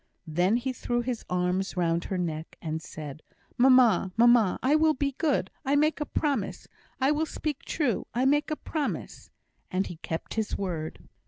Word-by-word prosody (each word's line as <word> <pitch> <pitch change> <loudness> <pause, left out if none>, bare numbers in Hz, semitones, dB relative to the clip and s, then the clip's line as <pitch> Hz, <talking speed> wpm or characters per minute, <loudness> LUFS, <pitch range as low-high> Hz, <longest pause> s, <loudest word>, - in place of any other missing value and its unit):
Then 175 +7 +2
he 260 +2 -2
threw 240 -1 -1
his 240 -1 -3
arms 180 +2 0
round 170 -1 +1
her 190 - -2
neck, 160 -3 -4
and 160 -1 -4
said: 150 -1 -8 0.3
"Mamma! 245 -7 +5
mamma! 235 -4 +5
I 265 +3 +3
will 310 0 +4
be 280 +1 0
good 310 -4 +1
I 280 0 +1
make 305 +1 +2
a 295 - -1
promise; 290 -3 -1 0.3
I 270 +2 +3
will 310 +1 +1
speak 300 -3 -4
true 285 -8 -1
I 245 +3 0
make 295 +3 +3
a 305 - 0
promise." 300 -1 -4 0.4
And 190 +1 0
he 175 - -7
kept 160 0 -5
his 220 -1 -1
word. 170 -5 -4
240 Hz, 175 wpm, -28 LUFS, 180-280 Hz, 0.4 s, Mamma